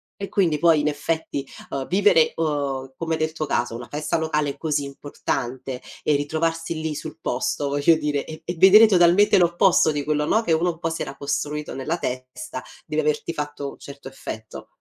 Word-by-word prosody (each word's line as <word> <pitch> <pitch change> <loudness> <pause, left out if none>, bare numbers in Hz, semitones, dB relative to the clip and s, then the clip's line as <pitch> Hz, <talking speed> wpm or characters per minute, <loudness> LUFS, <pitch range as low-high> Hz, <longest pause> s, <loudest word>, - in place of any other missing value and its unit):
E 200 -1 -6
quindi, 165 -7 +1
poi, 165 -1 +5
in 150 - 0
effetti, 150 -1 -2 0.3
uhm, 135 -1 -3
vivere, 190 -4 +4
uhm, 140 -4 -2
come 165 -1 -2
nel 155 0 -1
tuo 155 -1 -4
caso, 120 -4 0
una 120 +1 -7
festa 150 +2 -1
locale 150 -3 -1
così 150 -3 0
importante, 135 -2 -4 0.2
e 150 - +3
ritrovarsi 160 +3 -1
lì, 160 -1 -2
sul 155 +1 -7
posto, 140 +1 -1
voglio 145 +4 +4
dire, 150 -2 -1
e 155 0 -9
e 175 - -3
vedere 195 +5 +9
totalmente 185 0 +5
l'opposto 175 -1 +4
di 145 -1 -2
quello, 150 0 0
no, 220 +8 +2
che 170 - -1
uno, 165 +3 +2
un 165 - -12
po', 165 - -1
si 165 - -4
era 135 - -5
costruito 145 +1 -3
nella 155 +6 -2
testa, 130 - -5 0.2
deve - - -1
averti 455 0 -1
fatto 145 -1 -4
un - - -16
certo 140 -1 -10
effetto. 110 -4 -8
150 Hz, 190 wpm, -23 LUFS, 140-165 Hz, 0.3 s, vedere